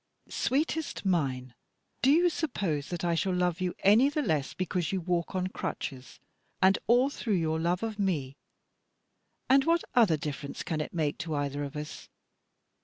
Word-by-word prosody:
"Sweetest 305 -2 -1
mine! 130 -9 0 0.5
do 265 - +4
you 335 +5 +5
suppose 190 - -2
that 175 -1 -3
I 170 - +2
shall 180 +2 0
love 180 0 0
you 180 -1 -1
any 220 +8 +6
the 295 +1 -1
less 150 - -1
because 180 -2 -1
you 190 - 0
walk 175 0 -2
on 185 0 0
crutches, 130 -8 -5 0.4
and 190 +1 +4
all 250 +4 +4
through 225 -7 -1
your 160 -2 0
love 175 +4 0
of 220 -2 -4
me? 150 -9 -1 1.1
And 270 +1 +5
what 335 +1 +3
other 215 -10 +5
difference 145 -1 -5
can 155 -2 -2
it - - -5
make 150 -3 -1
to 155 0 -3
either 145 0 -2
of 140 +1 -6
us? 150 0 -7
180 Hz, 170 wpm, -29 LUFS, 150-220 Hz, 1.1 s, any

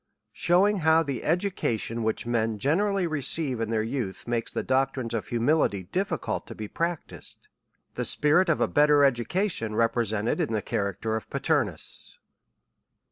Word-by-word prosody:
Shewi7ig 195 +4 +3
how 160 0 +4
the 140 -5 -4
Education 160 - -1
lohichmen 110 0 -1
generally 190 - +1
re 155 -3 -2
ceive 130 -3 +1
in 115 - -2
their 110 -1 0
youth, 115 -5 -4
makes 120 -1 -1
the - - -3
doctrines 130 -2 0
of 115 - -3
Humi 120 +5 +1
lity 100 - 0
difficult 195 +2 -2
to - - -8
he 110 - -5
practised. 170 +6 -5 0.5
The - - -3
spirit 160 +5 +3
of 165 - +2
a - - +2
better 145 -1 +4
Education 135 - 0
represented 115 -1 0
in 115 - -1
the 110 - -1
character 100 +2 -2
o/'Paternus. 130 - -2
130 Hz, 145 wpm, -26 LUFS, 110-160 Hz, 0.5 s, how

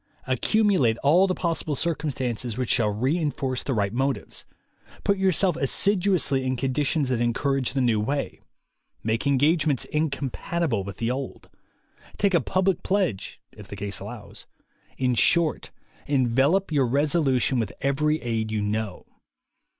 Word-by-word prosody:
Accumulate 135 - +2
all 170 +7 +5
the 185 - -1
possible 165 -4 -2
circumstances 130 -7 -2
which 125 -2 -1
shall 110 -4 +2
re 130 +11 0
enforce 135 -4 -2
the 135 - -2
right 100 -1 0
motives; 135 +2 -2 0.6
put 200 -1 +1
yourself 190 -2 +2
assiduously 175 -2 +1
in 130 0 -1
condi 135 +3 0
tions 150 -4 0
that 125 -2 0
encourage 130 +2 0
the 135 - 0
new 115 -4 +2
way; 140 +7 -2 0.6
make 115 +5 -1
engage 145 +4 +3
ments 140 -5 +1
incompatible 145 - -2
with 100 +1 -8
the 115 +1 -1
old; 135 +1 -6 0.7
take 200 -1 +2
a 170 - +4
public 185 +5 0
pledge, 185 - -1
if 105 - -13
the - - -8
case 100 0 -3
allows; - - -10 0.5
in 130 -1 +1
short, 165 +6 +2 0.4
envelop 140 +7 +2
your 140 -4 +2
resolution 135 -2 +1
with 110 -4 -2
every 150 +3 +1
aid 110 -2 -2
you 105 -1 -1
know. 105 -2 -3
135 Hz, 145 wpm, -25 LUFS, 120-160 Hz, 0.7 s, all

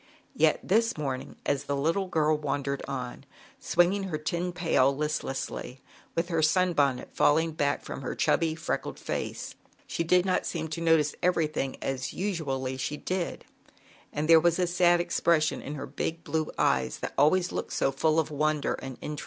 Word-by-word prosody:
Yet - - +3
this 225 +1 +2
morning, 135 -4 -4
as 140 - 0
the 140 - -1
little 165 +7 0
girl 155 -3 +2
wandered 140 -2 -2
on, 130 -2 -5 0.4
swinging 185 +3 +2
her 170 -5 -2
tin 170 +4 -2
pail 160 -6 +2
list 150 0 -1
lessly, 135 -1 -5 0.4
with 170 +1 0
her 165 -2 +1
sun 180 +3 +3
bonnet 140 -5 +1
falling 160 +2 +3
back 145 -2 0
from - - -6
her 130 - -4
chubby, 160 -1 +2
freckled 160 - -3
face, - - -4 0.3
she 165 - -2
did 180 +2 +3
not 185 - +1
seem 160 -2 -3
to 165 +2 -4
notice 160 -3 +3
everything 155 -6 0
as 135 -1 -3
usually 135 -9 -2
she 145 +3 -3
did, 185 +1 -3 0.7
and 150 +1 -2
there 165 0 +8
was 170 +1 +2
a 180 - +2
sad 175 0 +3
expression 170 -2 +1
in 145 - -6
her 140 - -5
big 165 +1 -4
blue 155 -1 -1
eyes 65 0 +1
that - - -5
always 175 +6 +3
looked - - -3
about - - -4
so 135 - +2
full 155 +4 +2
of 160 - -1
wonder 150 0 0
and 130 -1 -7
interest. 150 -1 -5
155 Hz, 180 wpm, -28 LUFS, 140-170 Hz, 0.7 s, there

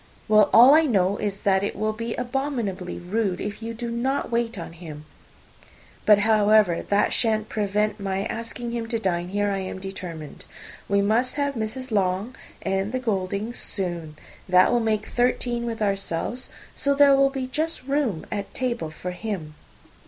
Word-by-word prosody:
"Well, 215 -1 +5
all 250 +5 +9
I 320 +1 +6
know 200 -4 +2
is, 200 -1 -3
that 190 -1 +3
it 205 - -2
will 215 +1 -1
be 230 +1 -4
abominably 245 -8 -3
rude 190 +1 -1
if 210 +1 -5
you 230 +1 -5
do 235 0 -4
not 250 +2 -1
wait 235 -1 -1
on 165 -1 -7
him. 155 -3 -10 1.0
But, 210 -1 +8
however, 215 -4 +4
that 205 +1 +1
shan't 220 -2 +1
prevent 210 +1 0
my 195 0 -2
asking 230 +1 -5
him 235 -1 -3
to 230 0 -1
dine 175 -5 -1
here, 205 +1 0
I 195 - -1
am 190 0 -5
determined. 180 -5 -7 0.5
We 200 0 +3
must 230 +5 +1
have 285 -1 0
Mrs. 245 +2 -4
Long 195 +3 0 0.3
and 195 +2 -1
the 255 - 0
Gouldings 210 0 -2
soon. 175 -5 -2 0.3
That 180 0 +5
will 240 - +3
make 215 -2 0
thirteen 240 -1 0
with 225 -2 -2
ourselves, 195 +4 -1 0.2
so 280 -1 +1
there 280 -1 +6
will 275 0 +4
be 270 -1 -3
just 310 +3 -3
room 270 - -1
at 200 -1 -4
table 240 -10 -2
for 180 +3 -6
him." 180 -5 -5
215 Hz, 170 wpm, -24 LUFS, 195-240 Hz, 1.0 s, all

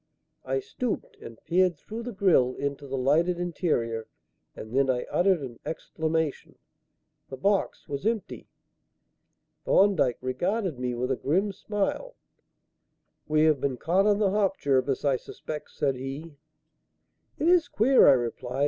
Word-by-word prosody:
I 135 +1 -1
stooped 245 - -4
and 115 - -11
peered 180 -1 +2
through 220 +9 -7
the 245 +1 -5
grille 180 - +3
into 140 0 -4
the 135 0 -3
lighted 165 +7 +2
interior; 120 -11 -1 0.5
and 110 +3 -8
then 135 0 +3
I 125 -1 +1
uttered 180 -4 +2
an 120 -3 -8
exclamation. 160 -2 -3 0.7
The 135 - -7
box 200 +8 0
was 140 -2 -4
empty. 225 -1 -2 1.2
Thorndyke 185 - +3
regarded 175 - -2
me 125 -1 -2
with 125 +2 -2
a - - +2
grim 190 +11 0
smile. 210 - -3 1.1
"We 155 0 +3
have 155 -4 +3
been 135 -3 -1
caught 185 - +2
on 205 -1 +4
the 205 -2 +2
hop, 195 -1 +1
Jervis, 135 0 0
I 135 -2 +3
suspect," 150 +4 -8
said 140 -2 0
he. 135 +5 -6 1.0
"It 315 - 0
is 350 -1 +4
queer," 255 +5 +5
I 140 - +9
replied. 125 +1 -3
155 Hz, 145 wpm, -27 LUFS, 130-195 Hz, 1.2 s, I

